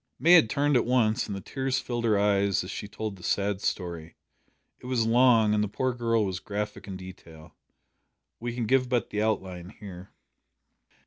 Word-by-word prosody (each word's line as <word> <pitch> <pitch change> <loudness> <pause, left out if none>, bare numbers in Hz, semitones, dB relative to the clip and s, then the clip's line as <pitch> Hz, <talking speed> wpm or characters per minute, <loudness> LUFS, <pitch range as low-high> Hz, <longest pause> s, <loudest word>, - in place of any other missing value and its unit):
May 170 - +3
had 165 -11 +7
turned 145 +2 +1
at 120 - +4
once, 120 -1 +1
and 100 - -4
the 100 - -6
tears 135 +2 -2
filled 120 -1 -3
her 110 -3 +3
eyes 100 -1 +2
as 90 - -7
she 105 - -6
told 105 -1 -6
the - - -15
sad 100 -1 -1
story. 85 -5 -4 0.6
It - - -11
was 125 -3 +1
long, 115 -2 +4
and 105 0 +2
the - - -1
poor 130 +5 -1
girl 115 -2 +1
was 95 -2 -3
graphic 105 +1 -5
in 95 -2 -6
detail. 85 -4 -12 0.9
We 120 0 -4
can 120 -2 -2
give 130 +2 +2
but 125 -2 -1
the 105 - -1
outline 95 -5 -2
here. 95 -3 -10
105 Hz, 190 wpm, -27 LUFS, 95-120 Hz, 0.9 s, had